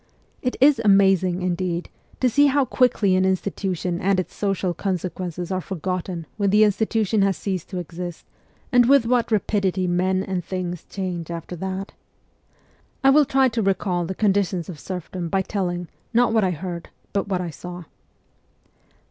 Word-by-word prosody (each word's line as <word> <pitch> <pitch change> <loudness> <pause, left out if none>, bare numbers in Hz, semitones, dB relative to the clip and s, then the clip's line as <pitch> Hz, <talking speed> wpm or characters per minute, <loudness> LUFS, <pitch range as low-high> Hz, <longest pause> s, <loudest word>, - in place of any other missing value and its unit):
It 250 - -2
is 270 -2 +5
amazing, 190 -3 +4
indeed, 175 -1 -1 0.3
to 255 - +4
see 285 +4 +4
how 280 0 +3
quickly 235 -8 +2
an 185 - +3
institution 185 -2 -1
and 195 0 +2
its 185 - -4
social 195 -3 -1
conse 185 0 -2
quences 180 0 -5
are 185 0 -1
forgotten 180 -1 -4
when 200 -2 +2
the 210 +2 +5
institution 215 0 +1
has 195 -3 +2
ceased 185 0 -3
to 185 - -5
exist, 175 0 -6 0.5
and 245 -1 +5
with 275 -4 +6
what 240 -1 +1
rapidity 195 -3 +1
men 185 +2 +1
and 185 -2 -3
things 180 -1 -4
change 180 -4 -4
after 170 +1 -6
that. 190 +2 -4 1.1
I 270 - +7
will 295 +1 +6
try 265 0 +3
to 230 -1 -1
recall 190 -3 0
the 190 - -4
conditions 195 -4 +1
of 165 -5 -7
serf 180 -3 -6
dom 175 -3 -4
by 190 +1 +1
telling, 180 -3 -2 0.3
not 240 -1 +4
what 220 -2 +3
I 190 - +2
heard, 175 0 -5 0.2
but 200 0 0
what 190 -2 -1
I 175 -2 -3
saw. 180 +2 -8
190 Hz, 170 wpm, -23 LUFS, 180-210 Hz, 1.1 s, I